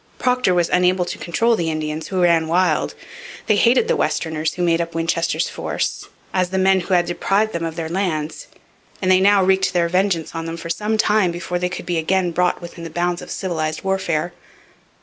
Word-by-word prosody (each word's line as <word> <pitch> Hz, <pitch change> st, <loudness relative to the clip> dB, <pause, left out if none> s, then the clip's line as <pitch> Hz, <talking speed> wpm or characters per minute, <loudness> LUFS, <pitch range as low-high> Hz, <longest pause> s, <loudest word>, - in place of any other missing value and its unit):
Procter 250 Hz, -7 st, +2 dB
was 175 Hz, -1 st, +2 dB
unable 180 Hz, 0 st, +2 dB
to -, -, -6 dB
control 230 Hz, +7 st, +1 dB
the 170 Hz, -5 st, -1 dB
Indians, 155 Hz, 0 st, -3 dB
who 185 Hz, -2 st, 0 dB
ran 165 Hz, -2 st, +3 dB
wild. 180 Hz, +3 st, +1 dB, 0.5 s
They 215 Hz, -, +3 dB
hated 245 Hz, -, +4 dB
the -, -, +2 dB
Westerners 160 Hz, -1 st, -1 dB
who 180 Hz, -, -2 dB
made 170 Hz, -1 st, +2 dB
up 170 Hz, -1 st, -5 dB
Winchester's 165 Hz, 0 st, 0 dB
force, -, -, -3 dB, 0.3 s
as 185 Hz, -1 st, +1 dB
the 190 Hz, -, -2 dB
men 190 Hz, 0 st, +4 dB
who 185 Hz, +1 st, 0 dB
had 175 Hz, -1 st, +3 dB
deprived 200 Hz, +5 st, 0 dB
them 170 Hz, -, -3 dB
of 165 Hz, -1 st, -3 dB
their 165 Hz, -1 st, -3 dB
lands, 165 Hz, -4 st, -3 dB, 0.5 s
and 185 Hz, -1 st, +1 dB
they 185 Hz, -, +6 dB
now 200 Hz, 0 st, +5 dB
wreaked 190 Hz, 0 st, +2 dB
their 170 Hz, -1 st, +2 dB
vengeance 180 Hz, -3 st, 0 dB
on 165 Hz, 0 st, -4 dB
them 165 Hz, 0 st, -5 dB
for 165 Hz, 0 st, -5 dB
some 215 Hz, +5 st, -1 dB
time 210 Hz, -3 st, +3 dB
before 175 Hz, +1 st, -3 dB
they 180 Hz, 0 st, -1 dB
could 180 Hz, -, -6 dB
be 175 Hz, -2 st, -1 dB
again 180 Hz, +2 st, +1 dB
brought 180 Hz, +1 st, 0 dB
within 170 Hz, 0 st, -9 dB
the 165 Hz, -, -6 dB
bounds 175 Hz, +2 st, -1 dB
of -, -, -10 dB
civilized 160 Hz, -5 st, -3 dB
warfare. 175 Hz, -3 st, -1 dB
175 Hz, 210 wpm, -20 LUFS, 165-190 Hz, 0.5 s, they